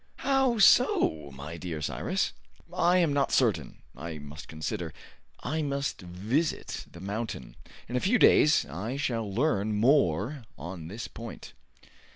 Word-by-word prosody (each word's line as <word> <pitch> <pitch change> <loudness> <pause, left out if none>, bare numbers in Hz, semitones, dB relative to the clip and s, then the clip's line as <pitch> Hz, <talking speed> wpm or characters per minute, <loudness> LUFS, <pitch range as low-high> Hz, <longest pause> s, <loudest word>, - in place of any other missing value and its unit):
"How 270 -3 +3
so, 80 - +4
my 75 +5 -8
dear 85 -2 -5
Cyrus?' 75 - -1 0.4
"I 180 0 +3
am 165 -5 +3
not 140 -1 +1
certain. - - +1
I 80 +4 -6
must 75 +1 -10
consider. 80 +2 -4 0.5
I 160 +1 -1
must 140 -5 -2
visit 105 - -2
the 85 - -12
mountain. 100 - -5 0.3
In 120 - -5
a - - +3
few 215 - +3
days 150 -7 +6
I 100 - -4
shall 115 -7 -1
learn 110 -3 +1
more 120 - +2
on 85 +3 -7
this 105 +7 -6
point." 115 0 -9
110 Hz, 140 wpm, -28 LUFS, -, 0.5 s, days